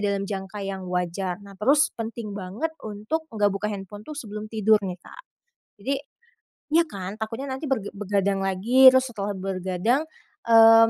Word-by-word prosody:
dalam 200 -1 0
jangka 195 0 -5
yang 190 -1 -4
wajar. 180 +1 -1
Nah, 200 - -12
terus 280 - +3
penting 225 -2 -5
banget 210 - -4
untuk 215 +9 -3
enggak 205 -2 +2
buka 210 +2 -2
handphone 205 +1 -7
tuh 300 +5 -8
sebelum 215 -3 -6
tidur 215 -1 +3
nih, 185 -2 -4
Kak. - - -13 0.6
Jadi 275 +5 0 0.8
iya 335 - +6
kan, 195 -2 -6
takutnya 225 +5 -3
nanti 280 +2 -5
berga 220 -7 -1
bergadang 200 -1 0
lagi, 225 +8 +6
terus 260 0 +3
setelah 205 0 -2
bergadang, 190 +6 0 0.5
mmm, 225 0 +8
210 Hz, 160 wpm, -25 LUFS, 195-230 Hz, 0.8 s, mmm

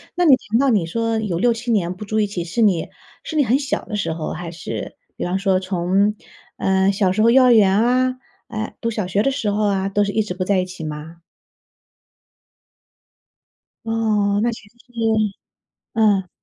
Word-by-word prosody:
那 355 0 +2
你 275 -4 +8
听到 255 +4 0
你 200 -8 +2
说 230 +5 -1
有 185 -6 -2
6-7 235 +1 +1
年 180 -4 0
不 210 - -8
住 215 +2 -1
一 210 - +2
起， 180 -4 -4
是 180 +8 -2
你 190 -6 +2 0.3
是 315 - -6
你 290 - +5
很 245 +4 +3
小 280 -1 -3
的 210 - -5
时 165 -5 -1
候， 160 -1 -4
还 170 0 -6
是， 170 -1 -6 0.2
比 - - -5
方 185 +2 -1
说 190 -1 +2
从， 190 +3 +1 0.4
呃， 190 +1 +2
小 195 -2 +1
时 215 - 0
候 230 - +5
幼 260 +2 +6
儿 250 - +6
园 200 -1 +4
啊， 255 +2 +2 0.3
呃， 220 -1 -5
读 230 - -1
小 210 -4 -3
学 200 +3 +1
的 275 - +2
时 265 -6 -2
候 210 +1 0
啊， 195 -1 0
都 205 +1 +1
是 200 - -1
一 220 - +1
直 180 - -5
不 185 0 -3
在 195 +1 +1
一 180 - 0
起 180 -3 -9
吗？ 155 +2 -7 2.6
哦， 215 -3 +1
那 235 +1 +1
其 210 -2 -10
实 235 - -34
是 245 - -24 1.0
嗯。 205 -4 +2
205 Hz, 210 characters per minute, -20 LUFS, 185-230 Hz, 2.6 s, 你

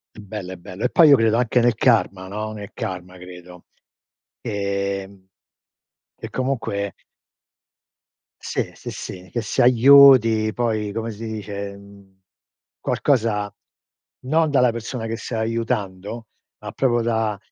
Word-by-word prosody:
È - - -12
bello, 100 -2 -7
è - - -8
bello. 90 +5 -7
E 125 - +2
poi 165 -3 +6
io 140 - +8
credo 115 -1 +2
anche 125 +1 +2
nel 120 -1 +3
karma, 105 -6 +1
no, 110 +2 -5
nel 105 -2 -9
karma 90 0 -6
credo. 90 -1 -13 0.8
Ehm, 100 -1 -4 0.9
e - - -8
comunque 115 -7 -2 1.5
Sì, - - -3
sì, - - -8
sì 90 0 -8
che 120 - -2
si 115 - -1
aiuti 120 -3 +6
poi, 110 -4 -1
come 115 +2 -4
si 110 +2 -8
dice, 100 -2 -6
mhmm, 100 -1 -18 0.6
qualcosa 110 -7 0 0.7
non 155 +3 +2
dalla 125 -3 +4
persona 115 +1 -5
che 115 0 -3
sta 115 -1 -5
aiutando, 110 -2 -3 0.3
ma - - -8
proprio 120 -3 +1
da 110 -2 -1
110 Hz, 135 wpm, -22 LUFS, 100-120 Hz, 1.5 s, io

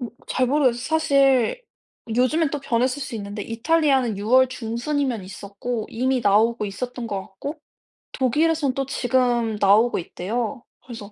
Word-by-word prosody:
어 245 - -4 0.2
잘 255 - 0
모르겠어요. 260 -3 +2
사실 275 - +2 0.5
요즘엔 280 +5 +2
또 295 - -3
변했을 255 +1 0
수 265 - -6
있는데 205 0 -6
이탈리아는 260 -2 +1
6 205 +2 -5
월 260 0 +6
중순이면 245 0 -2
있었고 205 +4 -5
이미 255 +2 0
나오고 220 +2 +3
있었던 245 +4 -5
것 200 -3 -3
같고 285 - -8 0.5
독일에선 295 +2 +1
또 270 +1 -2
지금 245 -4 0
나오고 210 +5 +4
있대요. 230 +8 -4 0.2
그래서 225 -5 -9
245 Hz, 325 characters per minute, -23 LUFS, 225-270 Hz, 0.5 s, 월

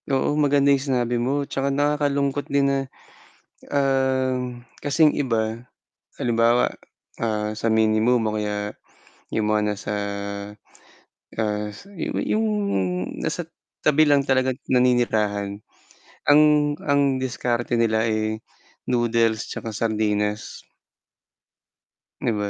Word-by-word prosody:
Oo, 135 +1 +1
maganda 145 -1 +3
yung 135 - +1
sinabi 125 -3 0
mo 140 +3 0
tsaka 135 0 -2
nakakalungkot 145 0 0
din 140 0 +2
na, 140 0 +2 0.9
ah, 130 -2 +1 0.5
kasing 150 +1 +3
iba. 115 -3 -1 0.6
Halimbawa 120 0 +3 0.5
ah, 105 -1 -2
sa 115 +1 0
minimum 110 +2 +3
o 105 - -2
kaya, 105 -1 -3 0.6
yung 105 -1 +1
mga 105 0 +2
nasa, 105 +1 -5 1.4
ah, 105 -1 -1 0.6
yung 220 +1 +1 0.7
nasa - - -2 0.4
tabi 150 +1 +4
lang 145 -1 +4
talagang 130 -1 +1 0.2
naninirahan, 110 -5 +1 0.7
ang 145 +1 +7 0.4
ang 140 -1 +2
diskarte 120 -2 -1
nila, 110 -1 +2
eh, 110 0 -1 0.4
noodles 115 -2 +1
'tsaka 115 - -5
sardinas. 105 -1 -2 1.5
Di - - 0
ba? 105 0 -2
120 Hz, 100 wpm, -23 LUFS, 110-140 Hz, 1.5 s, ang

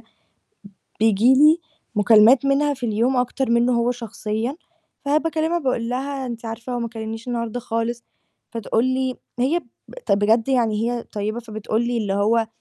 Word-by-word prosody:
ب - - -23 1.0
بييجي 225 +4 +4
لي 305 +4 +6 0.4
مكالمات 225 +4 +6
منها 285 +1 +2
في 250 -2 -5
اليوم 235 +4 +1
أكتر 250 +1 -1
مِنّه 235 +1 +3
هو 235 0 +1
شخصيًا، 230 +2 -4 0.5
فباكلمها 320 +3 +1
باقُول 255 -6 -1
لها: 265 +1 -3
"أنتِ 235 -1 -7
عارفة 230 +2 -6
هو 245 - -2
ما 235 -1 -3
كلّمنيش 225 +1 -7
النهارده 235 0 -3
خالص" 235 0 -3 0.5
فتقُول 230 +1 0
لي 260 0 -1 0.2
هي 275 +8 +2 0.3
ب - - -12
طَب 200 - +3
بجد 220 +4 +2
يعني 230 -3 +1
هي 240 -1 -3
طيبة 215 +2 -4
فبتقُول 220 0 -3
لي 240 0 -1
اللي 205 -3 -1
هو: 220 +3 +2
235 Hz, 160 wpm, -22 LUFS, 225-260 Hz, 1.0 s, لي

